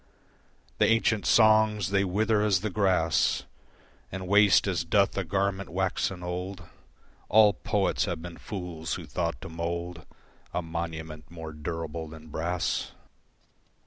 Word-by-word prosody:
The - - +5
ancient 115 -2 +2
songs 110 -3 +4
they 100 -1 +3
wither 105 +3 +1
as 100 -4 +2
the 105 -1 -2
grass 90 -6 +2 0.7
And 95 0 -5
waste 100 +1 +5
as 90 -4 0
doth 100 +4 +2
a 95 - -1
garment 100 +2 -1
waxen 95 0 -1
old, 90 +1 -5 0.7
All 105 0 +6
poets 100 0 0
have 85 -5 -3
been 85 0 -9
fools 85 -5 -5
who - - -7
thought 60 - -2
to - - -7
mould 85 0 -4 0.5
A 90 - 0
monument 80 -2 -6
more 80 -2 -8
durable 80 +1 -5
than 80 0 -12
brass. 85 +3 -2
90 Hz, 135 wpm, -28 LUFS, 80-100 Hz, 0.7 s, All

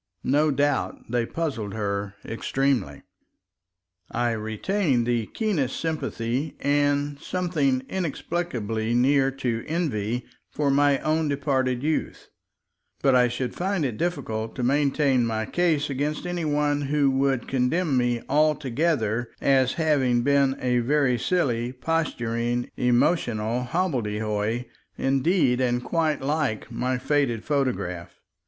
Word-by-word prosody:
No 150 +3 +3
doubt 145 -4 -1
they 120 -1 +1
puzzled 130 -12 -3
her 100 -1 -2
extremely. 120 - -1 1.1
I 120 0 0
retain 120 - 0
the 115 -2 0
keenest 175 - -1
sympathy 145 -3 -2
and 145 0 +1
something 150 -9 0
inexplicably 125 - -2
near 135 +2 +4
to 125 -4 -2
envy 125 - -1 0.2
for 145 -2 0
my 145 0 +4
own 155 0 +1
departed 135 -3 0
youth, 155 +1 -2 0.7
but 135 - +4
I 125 -1 +5
should 125 0 -3
find 185 -3 -1
it 120 -5 -3
difficult 120 -10 -2
to 125 - -3
maintain 140 -1 +2
my 110 -1 -1
case 165 0 +1
against 145 +4 -2
any 175 -2 -2
one 145 -1 +1
who 140 0 +2
would 135 -2 +1
condemn 135 +4 +1
me 120 -1 +1
altogether 140 -5 +1
as 130 -2 +3
having 135 -7 +2
been 140 0 +3
a 125 -1 +1
very 130 0 +2
silly, 125 -7 0
posturing, 120 -5 -1
emotional 120 -2 +1
hobbledehoy 110 - -1 0.3
indeed 135 -1 +2
and 120 -1 +1
quite 160 -3 0
like 135 -6 -1
my 125 +2 -1
faded 125 -4 0
photograph. 125 - -2
135 Hz, 120 wpm, -25 LUFS, 120-150 Hz, 1.1 s, I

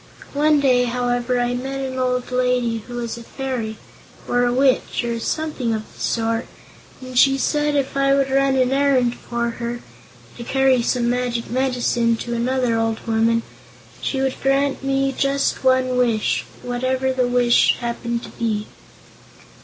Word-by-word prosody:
One 300 +1 +3
day, 250 -3 +3
however, 245 0 0
I 245 0 0
met 265 +2 -4
an 260 -1 -4
old 250 0 -1
lady 250 -2 +1
who 245 - -7
was 235 -1 -4
a - - -10
fairy, 240 -4 -4 0.5
or 245 0 +2
a 245 - +2
witch, 260 0 +1
or 235 -1 -2
something 260 -3 -2
of 215 - -4
the - - -18
sort, 230 0 -1 0.5
and 255 0 -9
she 270 +2 +5
said 295 +1 0
if 275 -1 -1
I 275 0 +3
would 275 -1 +1
run 275 0 +3
an 255 -1 +2
errand 270 -3 +2
for 235 -1 -3
her 235 0 -3 0.6
to 235 - -6
carry 265 0 +3
some 240 0 0
magic 245 -1 -1
medicine 245 -2 +1
to 240 +1 -5
another 245 0 0
old 225 -1 -2
woman 230 0 +2 0.6
she 270 - -2
would 265 -1 -1
grant 275 0 +1
me 270 0 +1
just 275 0 0
one 255 -1 +3
Wish, 235 -4 +1 0.2
whatever 255 +2 -1
the 255 -1 +1
Wish 245 -1 +4
happened 235 0 -3
to - - -8
be. 215 -3 -2
250 Hz, 160 wpm, -21 LUFS, 235-270 Hz, 0.6 s, she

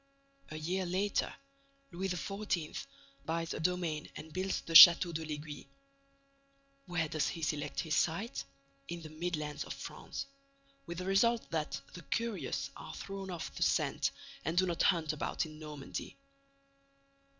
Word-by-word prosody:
A 155 - -6
year 180 +5 -1
later, 195 +3 0 0.6
Louis 190 +2 -2
XIV. 180 -2 -2 0.4
buys 165 0 -2
a - - -4
domain 165 -2 -1
and 155 0 -9
builds 190 +1 -1
the 165 - -6
Château 170 +1 +11
de 160 0 -2
l'Aiguille. 150 -2 -6 1.2
Where 175 -3 0
does 150 -2 0
he 165 - -4
select 150 -1 -1
his 160 -4 -1
site? 200 +8 0 0.4
In 170 -1 -5
the 155 - -8
Midlands 155 -2 -3
of - - -5
France, - - -6 0.6
with 170 0 -5
the 180 - -4
result 225 +5 +3
that 160 -2 -1
the 180 - -8
curious 230 +5 -2
are - - -8
thrown 195 -1 -6
off 175 -3 -5
the - - -8
scent - - +2 0.3
and 165 +2 -2
do 185 - +5
not 170 -2 -1
hunt 160 -3 +3
about 155 - -1
in 155 -1 -10
Normandy. 150 -3 -6
170 Hz, 150 wpm, -33 LUFS, 155-185 Hz, 1.2 s, Château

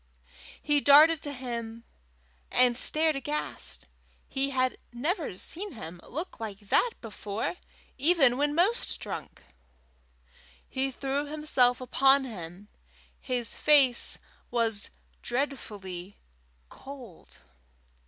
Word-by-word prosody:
He 295 -1 +1
darted 300 +3 +7
to 290 - +1
him, 235 -3 -6 0.7
and 250 -1 +4
stared 310 +4 +2
aghast: 295 +3 -4 0.4
he 275 0 -1
had 255 -1 0
never 295 - -2
seen 390 - -6
him 175 -6 -9
look 330 +8 -5
like 215 -3 -5
that 330 - +2
before, 210 - -4 0.4
even 280 -4 +4
when 290 +2 0
most 390 +8 +1
drunk! - - -7 1.2
He 265 +1 -1
threw 275 +2 -2
himself 285 -5 +3
upon 270 +2 +3
him: 185 -3 -9 0.5
his 245 -3 -1
face 275 -5 +4 0.3
was 225 -3 +1 0.3
dreadfully 205 -8 -4 0.5
cold. 250 - -12
260 Hz, 100 wpm, -28 LUFS, 225-290 Hz, 1.2 s, darted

